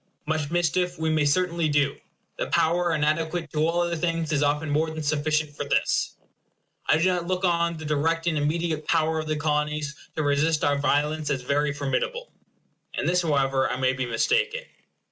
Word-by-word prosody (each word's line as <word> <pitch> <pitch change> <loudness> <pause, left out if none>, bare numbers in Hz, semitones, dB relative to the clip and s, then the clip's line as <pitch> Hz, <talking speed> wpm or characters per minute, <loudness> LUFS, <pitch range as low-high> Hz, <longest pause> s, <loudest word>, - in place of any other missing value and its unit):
Much 155 -1 -1
mischief 175 +1 0
we 160 0 0
may 155 -1 +2
certainly 170 +1 +1
do. 145 -1 +2 0.4
The - - -1
power 175 +2 +2
inadequate 155 +1 -1
to 155 +1 +2
all 170 +1 +1
other 170 0 0
things 165 -1 -1
is 145 -2 +1
often 150 +2 +1
more 155 +2 +1
than 155 0 -5
sufficient 155 0 0
for - - -3
this. 140 - 0 0.7
I 155 - +5
do 165 - +1
not 180 -2 0
look 185 +1 0
on 170 -1 +1
the 155 - -8
direct 160 +3 0
and 170 -2 +1
immediate 155 +1 -1
power 160 -1 +2
of 155 - -4
the 155 - 0
Colonies 150 -1 -1 0.2
to 155 - -1
resist 150 +2 +2
our 145 0 +2
violence 150 +2 +1
as 130 -3 -1
very 145 +3 +1
formidable. 145 - -2 0.6
In - - -2
this, 180 +1 +2
however, 135 -4 +1
I 125 - -2
may 130 0 +2
be 130 -1 -3
mistaken. 475 - +1
155 Hz, 185 wpm, -25 LUFS, 145-170 Hz, 0.7 s, I